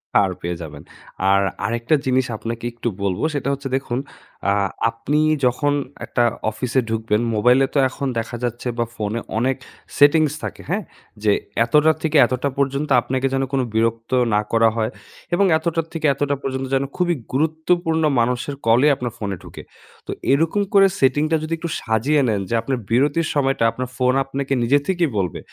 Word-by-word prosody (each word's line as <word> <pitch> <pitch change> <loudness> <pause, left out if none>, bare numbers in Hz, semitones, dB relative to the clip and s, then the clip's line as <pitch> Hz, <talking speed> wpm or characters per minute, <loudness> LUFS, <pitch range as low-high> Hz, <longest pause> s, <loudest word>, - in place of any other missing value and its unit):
পার 100 -2 +5
পেয়ে 85 +1 -3
যাবেন। 75 -3 -9 0.5
আর 100 - +4 0.2
আরেকটা 120 +6 +1
জিনিস 130 0 +2
আপনাকে 115 +1 -5
একটু 120 - -5 0.2
বলব, 95 -2 -1
সেটা 140 -1 -2
হচ্ছে 140 -1 -5
দেখুন, 125 -2 -4 0.5
আ - - +3 0.4
আপনি 115 +6 -1 0.3
যখন 145 +4 +1 0.3
একটা 120 - +1 0.3
অফিসে 125 +4 -1
ঢুকবেন 110 0 0
মোবাইলে 125 +5 +4
তো - - 0
এখন 140 +2 -4
দেখা 115 +1 -5
যাচ্ছে 120 +1 -3
বা 120 - +1
ফোনে 110 +1 -2 0.2
অনেক 130 +3 +1 0.4
settings 150 +1 +5
থাকে, - - -5
হ্যাঁ? 205 +4 -1 0.4
যে 105 - +4 0.3
এতটা 150 +6 +4
থেকে 155 -1 +1
এতটা 130 +4 -1
পর্যন্ত 140 +2 0
আপনাকে 130 +2 -1
যেন 135 - +1
কোন 135 -2 +1
বিরক্ত 115 +1 0 0.2
না 105 - +3
করা 115 0 +4
হয় 110 -1 0 0.4
এবং 200 +3 +4
এতটা 165 +1 -1
থেকে 160 -2 -3
এতটা 145 +1 -1
পর্যন্ত 130 0 -3
যেন 135 - +1
খুবই 175 -1 +1 0.2
গুরুত্বপূর্ণ 160 +2 +1 0.2
মানুষের 125 +4 0
কলেই 125 +6 +5
আপনার 125 -3 -4
ফোনে 100 -2 -3
ঢোকে। - - -10 0.5
তো - - -3 0.2
এরকম 165 +8 +2
করে 195 -1 +7
setting 135 +3 +3
টা - - +4
যদি 155 +1 -3
একটু 170 +1 -5
সাজিয়ে 120 +7 +1
নেন 105 -3 0
যে, - - -2
আপনার 130 +3 -2
বিরতির 145 +7 +2
সময়টা 135 -4 +1
আপনার 130 +1 -5
ফোন 125 0 +2
আপনাকে 135 0 -3
নিজে 140 +5 +4
থেকেই 175 -4 +1
বলবে 90 -5 -1
130 Hz, 170 wpm, -21 LUFS, 115-150 Hz, 0.5 s, করে